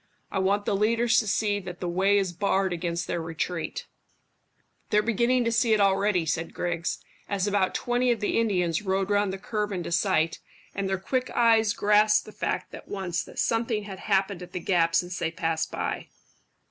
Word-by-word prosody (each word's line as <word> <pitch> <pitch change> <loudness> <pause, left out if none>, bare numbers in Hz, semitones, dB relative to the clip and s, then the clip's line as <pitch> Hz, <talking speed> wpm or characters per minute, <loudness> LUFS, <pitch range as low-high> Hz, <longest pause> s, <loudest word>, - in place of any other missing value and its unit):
I - - -1
want 200 +2 +1
the 200 - +1
leaders 230 +3 +3
to 215 - -2
see 205 0 +1
that 180 -2 -8
the 180 - -3
way 190 +4 +3
is 190 -3 0
barred 195 0 +1
against 170 0 -2
their 170 - -2
retreat." 165 +1 -4 1.0
"They're 210 0 +3
beginning 235 +3 +2
to 230 - +1
see 225 0 +3
it 215 - +3
already," 195 -2 +2
said 165 +1 -2
Griggs, 175 -1 -2 0.3
as 200 -2 0
about 200 -2 +1
twenty 245 +1 +1
of 235 - 0
the 205 +2 0
Indians 180 -7 +1
rode 195 0 -1
round 205 -1 +2
the 190 - -4
curve 210 +1 -3
into 175 -3 -4
sight, 165 -1 +1 0.3
and 195 -1 -2
their 190 - 0
quick 255 +7 -2
eyes 225 -3 +4
grasped 210 +1 +3
the - - -10
fact - - -3
at - - -10
once 185 -4 -3
that - - -14
something 225 -2 0
had 195 -2 -8
happened 195 -1 0
at 180 - -10
the 180 - -2
gap 165 -2 +2
since 180 +1 0
they 160 - 0
passed 165 -1 -2
by. - - -3
195 Hz, 195 wpm, -26 LUFS, 175-210 Hz, 1.0 s, eyes